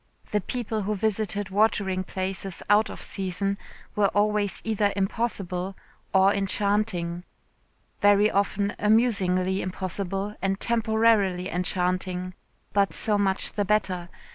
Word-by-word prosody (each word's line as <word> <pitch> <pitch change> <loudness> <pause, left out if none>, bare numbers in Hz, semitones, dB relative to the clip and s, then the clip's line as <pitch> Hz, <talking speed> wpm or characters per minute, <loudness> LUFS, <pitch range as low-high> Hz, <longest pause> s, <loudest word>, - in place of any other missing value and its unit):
The 210 - +1
people 225 +1 -3
who 210 +2 -1
visited 205 -1 -1
watering 200 -2 +1
places 190 0 -4
out 210 +1 +4
of - - -8
season 195 +1 -2 0.4
were 205 -1 +4
always 205 0 +1
either 210 -2 +1
impossible 195 -2 -2 0.3
or 190 +1 +5
enchanting. 195 -3 0 0.8
Very 205 +1 +5
often 200 0 0
amusingly 195 -4 +2
impossible 195 +2 -3
and 195 +1 0
temporarily 220 -5 +2
enchanting, 180 0 -1 0.4
but 200 -1 +2
so 210 -2 +3
much 195 -1 +2
the 205 - -1
better. 185 -4 0
200 Hz, 115 wpm, -26 LUFS, 185-210 Hz, 0.8 s, or